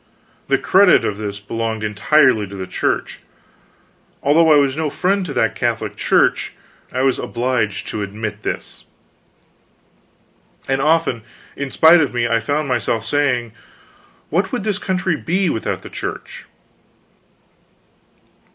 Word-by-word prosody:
The - - +3
credit 195 0 +4
of 105 0 -3
this 100 -1 -5
belonged 110 +1 -4
entirely 110 +1 +3
to 100 - -10
the 95 -1 -5
Church. 90 - -2 1.0
Although 160 +3 +4
I - - +7
was 140 -2 +3
no 155 -1 -1
friend 190 +5 0
to 145 - -5
that - - +1
Catholic - - -2
Church, - - +1 0.4
I 130 +1 -1
was 135 -1 +2
obliged 120 -4 -2
to 110 - -4
admit 105 +1 -5
this. - - -6 1.8
And 135 0 0
often, 155 -6 +1 0.3
in 140 -1 -4
spite 160 +5 +6
of 140 -4 -1
me, 120 -1 +1
I 115 0 +2
found 145 +6 -2
myself 115 -3 -1
saying, 125 -3 0 0.8
"What 190 +4 0
would 245 -6 -2
this 210 -2 -1
country 185 -3 -1
be 180 +1 0
without 110 - -3
the - - -9
Church?" - - -7
130 Hz, 135 wpm, -19 LUFS, 110-160 Hz, 1.8 s, I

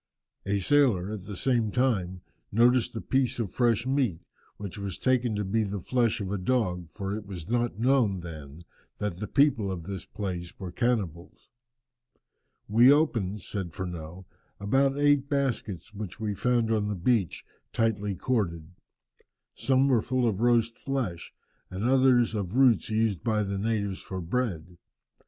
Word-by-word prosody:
A 100 0 +1
sailor, 110 -7 +3
at 100 -4 -7
the 105 - -6
same 120 0 +1
time, 95 -8 0 0.3
noticed 120 +2 +3
a 110 - -3
piece 130 -1 0
of 110 -7 -3
fresh 115 -2 +1
meat, 130 -10 0 0.4
which 100 -1 -7
was 100 -2 -4
taken 125 -3 +1
to 105 0 -2
be 110 +4 +1
the 100 -1 -3
flesh 120 +4 +1
of 100 -2 -4
a 100 - -1
dog, 90 -6 -1
for 100 +2 -4
it 105 -1 -7
was 90 -5 -7
not 120 -2 0
known 115 -6 +2
then 80 -2 -9 0.3
that 100 -4 -3
the 105 - -4
people 125 -7 +2
of 90 -3 -5
the 95 +2 -6
place 90 -4 -4
were 95 -2 -6
cannibals. 100 -7 -2 1.2
"We 120 +5 +6
opened," 110 - +1
says 95 -4 -4
Furneaux, 90 +1 -7 0.3
"about 135 +7 +2
eight 145 -1 +3
baskets 115 - -2
which 105 0 -7
we 105 -2 -2
found 120 +2 +1
on 105 -2 +1
the 105 - -2
beach, 95 0 0 0.3
tightly 105 -3 0
corded. 90 -6 -2 0.8
Some 135 0 +2
were 125 -5 +3
full 125 +1 0
of 105 -2 -1
roast 115 -1 +2
flesh, 125 -12 -3 0.4
and 95 +2 -5
others 125 -2 +4
of 100 -1 -3
roots 130 -4 +4
used 110 -4 0
by 110 -2 +1
the 100 -1 -3
natives 100 -3 -1
for 95 - -6
bread. 90 -3 -3
105 Hz, 160 wpm, -27 LUFS, 95-125 Hz, 1.2 s, We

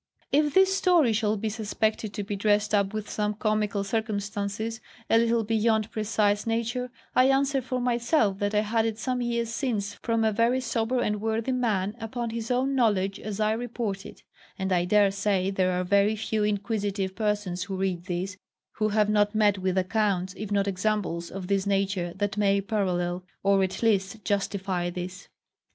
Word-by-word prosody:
If 295 0 +2
this 385 0 +5
story 345 - +4
shall 215 -1 +1
be 220 +2 -2
suspected 215 0 -1
to 205 - -2
be 205 +1 -4
dressed 205 +1 +1
up 200 -1 +2
with 215 -1 -4
some 210 0 -1
comical 215 -1 0
circumstances, 210 +1 -3 0.3
a 225 - +6
little 230 0 +2
beyond 220 0 +1
precise 210 -1 0
nature, 235 +2 -1 0.3
I 255 - +6
answer 270 0 +2
for 255 0 -3
myself 235 -4 +1
that 205 +1 -1
I 210 - +4
had 225 +1 +1
it 220 -1 -3
some 250 +2 -2
years 235 -1 -1
since 220 -6 -2
from 230 +1 -1
a 220 - +3
very 230 +4 +2
sober 230 0 -1
and 210 -3 -1
worthy 225 +3 -1
man, 215 -5 0
upon 235 +1 -4
his 230 0 -4
own 255 +2 +1
knowledge, 205 -6 +1
as 215 -1 -5
I 215 0 +2
report 225 -4 -3
it; - - -12 0.3
and 190 0 -2
I 175 -1 +2
dare 205 +1 +4
say 195 -1 0
there 185 -1 +1
are - - 0
very 200 +3 +3
few 215 0 -1
inquisitive 205 -2 -1
persons 205 -4 -1
who 195 -1 -4
read 185 -2 -2
this, 185 +1 -3 0.4
who 215 0 +1
have 210 0 +2
not 210 0 +2
met 205 -2 +3
with 185 0 -1
accounts, 190 -1 0
if 210 -1 -6
not 200 -1 +1
examples, 190 -3 -1
of 195 -1 -6
this 195 +1 0
nature, 195 -3 0
that 205 +1 -2
may 200 -1 +3
parallel, 180 -3 -1 0.2
or 195 0 +4
at 190 +4 -2
least 210 -1 +1
justify 195 -3 -1
this. 180 +2 -6
210 Hz, 180 wpm, -27 LUFS, 195-225 Hz, 0.4 s, a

